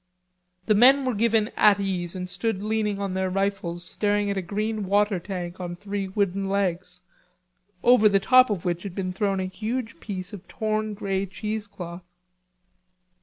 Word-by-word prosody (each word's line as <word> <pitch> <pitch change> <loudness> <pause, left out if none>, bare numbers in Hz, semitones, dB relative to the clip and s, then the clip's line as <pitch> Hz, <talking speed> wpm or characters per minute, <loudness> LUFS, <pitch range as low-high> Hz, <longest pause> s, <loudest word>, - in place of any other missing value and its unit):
The 215 - +4
men 260 +6 +6
were 255 - +1
given 220 0 +2
"at 205 -1 +5
ease" 185 -3 -2
and 180 0 -4
stood 200 +1 -2
leaning 215 -1 0
on 200 -2 -2
their 190 0 0
rifles 185 -3 -2
staring 205 +3 0
at - - -2
a 190 - -1
green 210 +2 -3
water 205 0 +2
tank 180 -1 -6
on 175 -1 -5
three 200 +1 -4
wooden 195 0 -1
legs, 180 -2 -1 0.8
over 240 -3 +6
the 200 -1 +3
top 255 +4 +6
of 195 -5 -2
which 175 -1 -1
had 195 -2 -7
been 185 -2 -3
thrown 195 0 0
a 185 - -1
huge 220 +5 -4
piece 190 -1 -6
of 200 -2 -9
torn 215 -1 -2
grey 195 -1 -2
cheesecloth. 200 -4 -6
200 Hz, 170 wpm, -25 LUFS, 185-215 Hz, 0.8 s, men